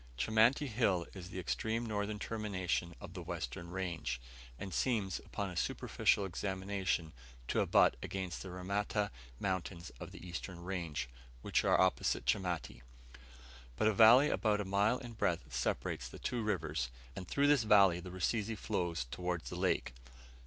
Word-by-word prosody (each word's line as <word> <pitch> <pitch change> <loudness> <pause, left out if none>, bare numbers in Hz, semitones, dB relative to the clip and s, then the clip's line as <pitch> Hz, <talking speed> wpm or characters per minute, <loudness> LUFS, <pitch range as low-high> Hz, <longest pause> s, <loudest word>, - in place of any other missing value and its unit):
Chamati 110 - +4
Hill 105 -7 +1
is 90 -2 -8
the 95 - -7
extreme 110 +6 -1
northern 105 -1 -2
termination 95 -6 -2
of - - -9
the - - -6
western 85 - -5
range, 90 -8 -3 0.4
and 95 +4 -6
seems, 105 -8 0
upon 100 -2 -4
a - - -8
superficial 100 +3 +1
examination, 95 -3 -2 0.4
to - - +2
abut - - +5
against 95 -3 -4
the 95 - -7
Ramata 100 +3 -1 0.3
mountains 95 -3 -3
of - - -7
the 90 - -10
eastern 90 0 -6
range, 85 -8 -3 0.4
which - - +2
are - - +4
opposite - - +2
Chamati; 90 -2 -1 0.9
but 85 - +2
a 110 - +4
valley 115 +8 +8
about 105 -2 +2
a 105 - -2
mile 100 +5 +2
in 120 -3 -8
breadth 85 - -1
separates - - -1
the - - -10
two 125 -2 -2
ranges, 80 - -1 0.3
and 90 - -6
through 140 +8 +2
this 145 -3 +5
valley 100 -5 +6
the 90 +1 -8
Rusizi 105 +4 -1
flows 85 -8 -1
towards 90 +4 -3
the - - -4
lake. 60 - 0
95 Hz, 155 wpm, -35 LUFS, 85-105 Hz, 0.9 s, valley